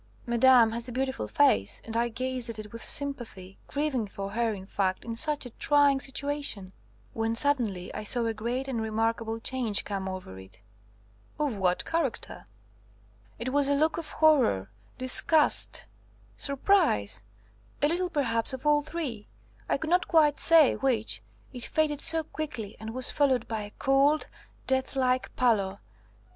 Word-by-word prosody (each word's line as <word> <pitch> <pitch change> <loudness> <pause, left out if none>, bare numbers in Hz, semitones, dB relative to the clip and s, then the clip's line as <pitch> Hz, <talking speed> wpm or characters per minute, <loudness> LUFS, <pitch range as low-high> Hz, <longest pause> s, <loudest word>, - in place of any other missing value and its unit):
Madame 240 -1 +5
has 235 +2 -4
a - - -6
beautiful 265 +2 -2
face, 280 - +2
and 225 - -6
I 235 +1 +1
gazed 255 0 -2
at 230 - -3
it 215 0 -9
with 230 - -8
sympathy, 240 -10 -3
grieving 280 -6 -1
for 195 0 -6
her, 230 +1 0
in 190 -3 -7
fact, 190 -2 -2
in 230 -1 -4
such 300 +3 +2
a 245 - -8
trying 285 +1 +3
situation; 275 -8 -3 0.4
when 225 0 -1
suddenly 230 -9 0
I - - -5
saw 235 +3 0
a 225 - -1
great 240 +5 -3
and 245 -4 -2
remarkable 225 +1 -1
change 235 -3 -1
come 195 -2 -4
over 185 - -8
it." 95 0 -15 0.8
"Of 295 -4 -1
what 180 -2 0
character?" 325 -7 -3 0.9
"It 250 +4 -4
was 285 -1 +3
a 285 - +2
look 315 +3 +1
of 320 - -7
horror, 250 - +3 0.3
disgust, 290 +4 +2 0.5
surprise, 280 - +1 0.6
a - - +6
little 355 +3 -1
perhaps 265 -8 -1
of 260 +2 -7
all 295 0 +4
three; 295 -9 -5 0.4
I - - +2
could 315 +3 -5
not 360 +1 +2
quite 305 -4 +3
say 325 -4 +6
which, 225 - 0 0.3
it 245 - -4
faded 300 -2 0
so 325 0 +6
quickly 285 -10 -6
and 220 - -7
was 255 -1 -2
followed 275 -4 +1
by 220 -2 -3
a 205 0 -8
cold, 280 +3 +2 0.4
deathlike 260 -1 0
pallor. 200 -6 +1
250 Hz, 155 wpm, -28 LUFS, 220-285 Hz, 0.9 s, a